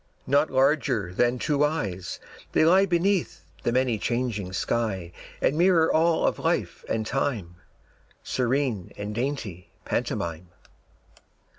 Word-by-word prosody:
Not 145 +3 +3
larger 130 - +1
than 120 +5 +2
two 145 +2 +1
eyes, 100 - -2 0.3
they - - +4
lie 190 +4 +5
Beneath 180 +1 0 0.2
the 120 - 0
many 125 -3 +1
changing 115 -6 -2
sky 95 -3 -1 0.3
And 140 - +3
mirror 170 -1 +4
all 165 +1 +3
of - - 0
life - - -1
and 110 -1 -1
time, 110 -10 -2 0.7
Serene 125 -6 -1
and 105 +1 -4
dainty 115 -8 -4 0.2
pantomime. 85 +1 -2
125 Hz, 120 wpm, -26 LUFS, 100-150 Hz, 0.7 s, lie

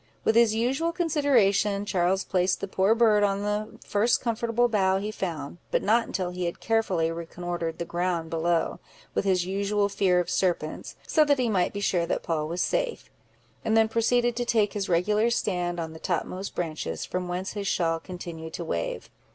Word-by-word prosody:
With - - +3
his 230 -1 +4
usual 270 +9 +1
consideration, 245 - +2
Charles 190 -1 +1
placed 185 0 +1
the 195 - -4
poor 195 +3 +2
bird 220 -3 +4
on 200 0 +1
the 210 +1 -2
first 215 +4 +2
comfortable 235 0 +1
bough 190 -4 +2
he 205 +2 -3
found, 170 -6 -5
but - - 0
not 230 +3 +3
until 180 -2 -2
he 180 0 -3
had 170 - -3
carefully 190 -8 +1
reconnoitered 170 0 -4
the 170 - -3
ground 170 -1 -2
below, 165 0 0 0.3
with - - 0
his 185 -2 +2
usual 200 +2 0
fear 190 -2 +2
of 175 - -1
serpents, 180 -3 -1
so 310 - +4
that 285 -1 +3
he 250 -2 +1
might 185 -4 +1
be 200 - -5
sure 175 -4 +1
that - - -1
Poll 155 -2 -1
was 170 +3 -2
safe; - - -2 0.5
and 220 0 +2
then 220 0 +5
proceeded 240 +2 +2
to 245 - 0
take 220 -4 +1
his 200 -2 -3
regular 210 +6 +2
stand 180 -6 -1
on 160 -1 -4
the 160 - -10
topmost 185 +2 -3
branches, 155 - -3
from 180 0 -3
whence 180 +2 -3
his 205 -1 -4
shawl 165 -3 +1
continued 165 -2 -8
to 170 - -5
wave. 85 - -3
195 Hz, 190 wpm, -26 LUFS, 175-220 Hz, 0.5 s, then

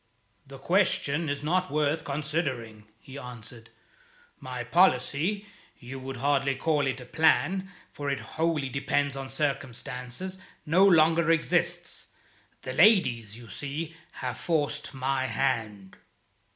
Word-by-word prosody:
"The 135 0 -10
question 165 -1 +2
is 145 0 -3
not 185 +4 +1
worth 150 +1 +1
considering," 140 -7 -3
he 135 +4 -10
answered. 120 -2 -9 0.7
"My 125 -1 -5
policy 170 - +2 0.3
you 130 +2 -8
would 130 0 -6
hardly 135 +1 +1
call 145 0 +1
it 130 0 -2
a 125 - -9
plan, 175 +6 +2 0.2
for 145 -1 -4
it 140 - -1
wholly 160 -3 -1
depended 140 +1 0
on 135 -1 -5
circumstances 135 +4 -3 0.3
no 170 +5 +4
longer 165 -2 +5
exists. 165 -1 0 0.6
The 130 - -4
ladies, 125 - +4
you 120 -1 -12
see, 150 +6 -5 0.2
have 125 -3 -5
forced 145 -3 -1
my 130 0 0
hand." 110 -8 -2
140 Hz, 125 wpm, -28 LUFS, 130-160 Hz, 0.7 s, longer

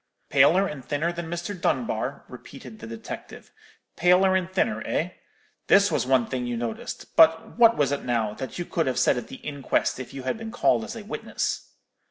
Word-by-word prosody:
"'Paler 155 +8 +5
and 150 -8 -6
thinner 150 +6 -1
than 170 -1 -6
Mr. 175 +4 -4
Dunbar,' 130 - -2
repeated 125 -2 -11
the 115 - -8
detective; 115 0 -9 0.4
'paler 185 +2 +4
and 185 -1 -1
thinner, 210 +3 0
eh? 175 +4 -1 0.6
This 200 +1 +5
was - - 0
one 130 -3 +3
thing 125 0 -3
you 120 -1 -2
noticed; 115 -1 -6
but 160 0 +5
what 230 -1 +7
was 140 -2 +2
it, 140 - -1
now, 115 -4 0
that 130 - -7
you 175 - -3
could 165 -3 -1
have 130 -1 -1
said 130 - +4
at 120 -2 -5
the 135 - -9
inquest 140 -2 -1
if 130 -1 -7
you 135 -1 -7
had 130 - -2
been 225 0 -6
called 225 -1 +2
as 225 +1 -7
a 225 - -7
witness?' 215 - -3
145 Hz, 200 wpm, -25 LUFS, 125-180 Hz, 0.6 s, what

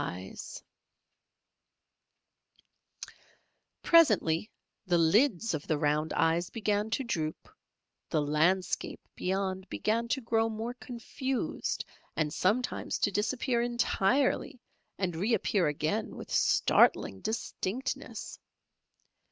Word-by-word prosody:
Presently 215 - +4 0.4
the 175 -1 +3
lids 210 - +3
of 150 -2 -4
the 155 - +1
round 150 +1 +1
eyes 165 +2 +2
began 210 -1 -1
to 230 +4 -1
droop, 160 -10 -3 0.6
the 155 - +1
landscape 170 +6 +1 0.2
beyond 190 0 -2
began 230 +2 0
to 270 - 0
grow 225 -1 +1
more 225 +2 -4
confused, 255 +2 -3 0.3
and 150 -2 0
sometimes 225 +7 0
to 205 - +1
disappear 235 +4 0
entirely 240 +3 +1 0.4
and 180 -4 -1
reappear 200 -1 +1
again 150 +1 -1
with - - -9
startling 95 - +3
distinctness. 225 +1 -4
205 Hz, 90 wpm, -30 LUFS, 165-235 Hz, 0.6 s, Presently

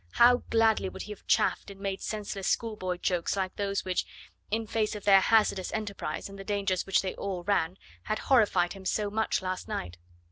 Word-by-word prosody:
How 245 +1 +7
gladly 225 -4 +3
would - - -7
he 210 - -8
have 210 - -11
chaffed - - +2
and 195 -1 -11
made 195 -1 -3
senseless 205 -2 -4
schoolboy 210 -6 -1
jokes 180 +1 0
like 190 -1 -2
those 200 -1 -2
which 185 -1 0 0.5
in 225 +2 -1
face 215 0 -1
of 205 - -7
their 195 -1 +7
hazardous 210 -3 +3
enterprise 210 -2 -4
and 195 0 -11
the - - -6
dangers 195 -3 -1
which 195 - +3
they 190 - -2
all 190 -3 -4
ran 185 -2 +1 0.3
had 215 - -1
horrified 210 -9 +3
him 195 -1 -11
so 205 +2 -1
much 220 -2 0
last 185 0 -3
night. 90 -1 -5
200 Hz, 200 wpm, -29 LUFS, 185-215 Hz, 0.5 s, How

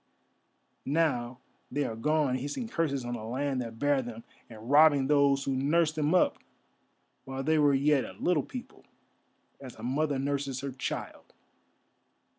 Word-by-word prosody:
Now 135 -5 0 0.3
they 145 +2 0
are 115 -4 -3
gone 150 +2 +1
hissing 145 - -3
curses 145 - -1
on 120 - -3
the 115 -3 -5
land 130 +3 -2
that 115 -2 -7
bare 145 +1 +2
them, 115 -2 -8 0.3
and 110 0 -11
robbing 145 -2 +6
those 140 -1 +3
who 135 -1 -1
nursed 155 +4 +2
them 155 +2 +1
up 180 - +3 0.9
while 135 0 -5
they 155 +2 +2
were 145 -2 +4
yet 140 0 +3
a 95 - -8
little 155 - +1
people, 250 - -9 0.8
as 130 -3 -10
a 110 - -12
mother 140 +3 0
nurses 140 -1 -2
her 140 0 -4
child." 130 - -6
140 Hz, 155 wpm, -29 LUFS, 130-150 Hz, 0.9 s, robbing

